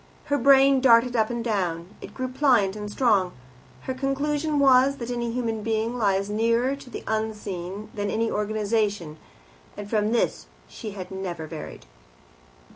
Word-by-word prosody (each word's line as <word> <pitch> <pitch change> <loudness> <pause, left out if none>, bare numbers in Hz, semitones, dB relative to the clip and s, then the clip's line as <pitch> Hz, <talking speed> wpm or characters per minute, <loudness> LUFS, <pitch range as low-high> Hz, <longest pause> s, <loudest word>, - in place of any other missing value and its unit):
Her 285 0 0
brain 270 +1 +5
darted 245 -1 +5
up 220 -2 +2
and 235 -1 -3
down; 180 -6 -2
it - - -10
grew 255 -1 -2
pliant 250 -7 +2
and 210 -1 -6
strong. 205 -7 +2 0.5
Her 260 - -4
conclusion 290 +3 -1
was, 270 0 +5
that 240 -1 -5
any 235 -1 -2
human 230 -2 -2
being 225 +2 -1
lies 200 -4 +1
nearer 230 +5 +1
to 275 -2 -13
the - - -7
unseen 210 -3 -4
than 205 -1 -2
any 225 +2 0
organization, 210 -5 -1 0.6
and 205 - -6
from 210 0 0
this 235 - 0 0.2
she 220 -3 -8 0.2
never 185 -4 -5
varied. 155 0 -9
225 Hz, 150 wpm, -25 LUFS, 205-255 Hz, 0.6 s, brain